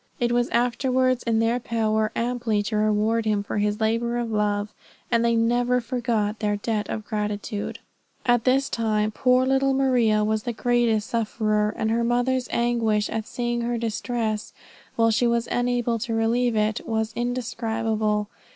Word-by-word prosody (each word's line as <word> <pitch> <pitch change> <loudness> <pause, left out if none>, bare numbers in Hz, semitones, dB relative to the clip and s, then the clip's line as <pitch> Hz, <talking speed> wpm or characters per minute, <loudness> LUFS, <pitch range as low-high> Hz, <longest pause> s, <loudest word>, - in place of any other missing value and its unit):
It 240 -1 +1
was 240 0 +1
afterwards 255 +1 +1
in 230 -1 +1
their 230 +2 +2
power 220 -2 0
amply 235 -3 0
to 215 +1 -3
reward 215 +2 +1
him 210 -2 +1
for 205 - -3
his 210 +1 0
labor 230 +2 0
of 235 -1 -2
love, 210 0 0 0.4
and 235 -1 +3
they 235 0 +2
never 240 +2 +2
forgot 230 -3 -1
their 210 -1 0
debt 210 0 -2
of 215 -1 -4
gratitude. 210 -1 -3 0.5
At 240 -2 +3
this 270 +2 +2
time 215 -2 0
poor 250 +3 +3
little 270 0 +2
Maria 240 -6 +3
was 215 0 0
the 240 +2 -3
greatest 230 -2 +1
sufferer, 215 -2 0
and 220 - 0
her 235 +1 +1
mother's 245 +1 +1
anguish 230 -3 +1
at 220 -1 -3
seeing 240 -1 -2
her 235 0 -1
distress 225 -1 -2 0.4
while 230 0 +3
she 240 +2 +2
was 235 0 0
unable 245 -1 0
to 225 +1 -2
relieve 230 +1 +1
it, 215 +1 0
was 220 -1 -1
indescribable. 225 -3 -1
230 Hz, 160 wpm, -24 LUFS, 215-240 Hz, 0.5 s, and